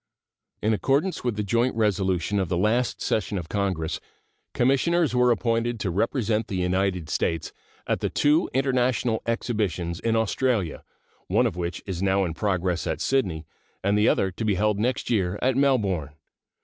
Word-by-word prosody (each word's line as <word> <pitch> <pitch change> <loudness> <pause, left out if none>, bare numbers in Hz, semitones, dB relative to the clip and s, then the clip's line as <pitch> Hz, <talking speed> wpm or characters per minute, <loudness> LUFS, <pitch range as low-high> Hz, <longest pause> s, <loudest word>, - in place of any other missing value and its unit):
In 110 +1 +3
accordance 140 - 0
with 120 -3 -1
the 105 - -2
joint 115 +5 +1
resolution 100 -3 +1
of 95 -4 -1
the 90 - 0
last 115 +6 +1
session 105 -1 -1
of 85 -4 -5
Congress, 95 -6 -1 0.5
commissioners 145 +6 +2
were 125 0 +4
appointed 115 0 0
to 95 - -1
represent 110 +2 0
the 100 - -4
United 90 -1 0
States 80 +1 -1 0.3
at - - 0
the - - -1
two 150 +4 +2
international 125 -3 +1
exhibitions 100 -8 -1
in 115 -1 0
Australia, 110 - 0 0.4
one - - +3
of - - -1
which 90 0 -4
is 95 -3 -4
now 95 0 +2
in 85 - -3
progress 90 -1 -1
at - - -2
Sydney, 95 -13 0 0.4
and 100 +1 +2
the 105 +1 +4
other 95 - +1
to 90 - -5
be 105 -3 +1
held 105 +1 +1
next 125 +3 -1
year 95 -4 +1
at 130 0 +1
Melbourne. 105 - +1
105 Hz, 165 wpm, -25 LUFS, 95-120 Hz, 0.5 s, were